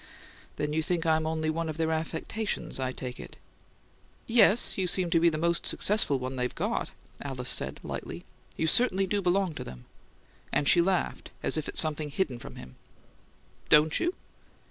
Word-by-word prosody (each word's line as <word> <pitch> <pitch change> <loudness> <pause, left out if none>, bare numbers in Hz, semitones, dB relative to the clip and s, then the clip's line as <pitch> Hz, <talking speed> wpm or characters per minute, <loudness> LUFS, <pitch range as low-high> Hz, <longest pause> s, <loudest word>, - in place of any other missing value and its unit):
"Then 150 0 -2
you 160 - +1
think 170 +1 -1
I'm 160 -1 +2
only 160 0 -1
one 165 0 -3
of 155 - -5
their 160 0 0
affectations, 160 +5 -3
I 130 -1 -1
take 125 -1 -7
it." - - -10 0.9
"Yes, 225 -1 +4
you 190 -2 0
seem 180 -1 -1
to 165 - +4
be 170 +1 +5
the 155 - -3
most 170 +2 +1
successful 205 -9 +1
one 130 +1 -5
they've 125 0 -2
got!" - - -2 0.3
Alice 130 -3 -1
said, 65 +2 +1
lightly. - - -6 0.3
"You 160 - 0
certainly 195 +1 +3
do 200 +2 0
belong 185 -1 +1
to - - -6
them." 60 0 -11 0.7
And 145 - +1
she 175 - +7
laughed 185 +1 -1
as - - +2
if 155 -1 -2
at - - -5
something 155 -1 +2
hidden 140 -5 -2
from - - -10
him. 65 0 -12 0.9
"Don't 150 +1 +6
you?" 350 - +1
160 Hz, 180 wpm, -28 LUFS, 145-180 Hz, 0.9 s, she